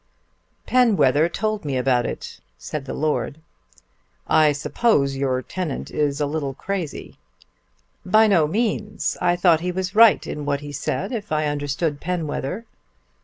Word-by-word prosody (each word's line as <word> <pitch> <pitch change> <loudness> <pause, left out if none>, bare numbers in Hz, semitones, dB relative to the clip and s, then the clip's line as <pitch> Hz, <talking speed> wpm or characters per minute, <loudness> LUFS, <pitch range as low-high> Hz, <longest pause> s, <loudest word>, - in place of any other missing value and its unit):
"Penwether 170 - +3
told 215 +3 -2
me 140 -3 -2
about 125 -1 +1
it," - - -7 0.2
said 135 - -6
the 130 - -5
Lord. 155 0 -1 0.9
"I 155 -1 +5
suppose 145 - +1
your 130 -1 -1
tenant 180 -6 -5
is 145 -1 0
a 145 - +1
little 145 -2 -3
crazy." 185 -2 -5 0.8
"By 215 +4 +5
no 175 -8 +4
means. 210 +2 -1
I 175 0 +3
thought 175 -2 +4
he 180 +2 -2
was 185 +1 -3
right 225 0 +6
in 150 - -5
what 145 0 -1
he 145 0 -7
said, 140 - -3
if 215 -7 -5
I 155 0 +1
understood 145 +1 -2
Penwether." 175 - -3
155 Hz, 145 wpm, -22 LUFS, 145-190 Hz, 0.9 s, right